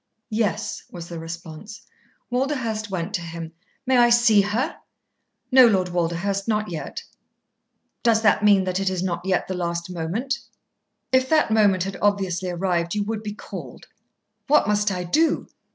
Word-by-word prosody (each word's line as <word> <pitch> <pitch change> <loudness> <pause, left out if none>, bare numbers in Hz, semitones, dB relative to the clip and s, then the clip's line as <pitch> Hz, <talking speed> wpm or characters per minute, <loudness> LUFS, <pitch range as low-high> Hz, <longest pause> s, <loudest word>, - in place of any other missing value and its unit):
"Yes," 215 -5 -1
was 170 -2 -8
the 170 -1 -6
response. 170 +5 -9 0.5
Walderhurst 245 -5 -1
went 185 +1 -3
to 185 - -1
him. 165 -1 -7 0.3
"May 260 0 +3
I 240 0 +6
see 235 -3 +5
her?" 210 +6 -1 0.7
"No, 255 -1 +8
Lord 190 -5 +2
Walderhurst. 175 +4 -1
Not 215 -3 0
yet." 165 - -5 1.0
"Does 225 -1 +3
that 215 -1 +4
mean 200 -2 +5
that 185 0 -1
it 195 -1 +1
is 185 -1 -2
not 175 -2 -2
yet 190 -1 0
the 190 - -3
last 170 0 -3
moment?" 180 +11 -2 0.7
"If 260 0 +3
that 310 -7 +3
moment 205 -4 +4
had 195 0 -5
obviously 190 -3 0
arrived, 175 0 -1
you 205 - 0
would 215 +1 -3
be 210 -1 -6
called." - - -9 0.6
"What 300 -6 +4
must 210 0 +2
I 180 -2 -3
do?" 310 - +1
195 Hz, 160 wpm, -23 LUFS, 175-220 Hz, 1.0 s, No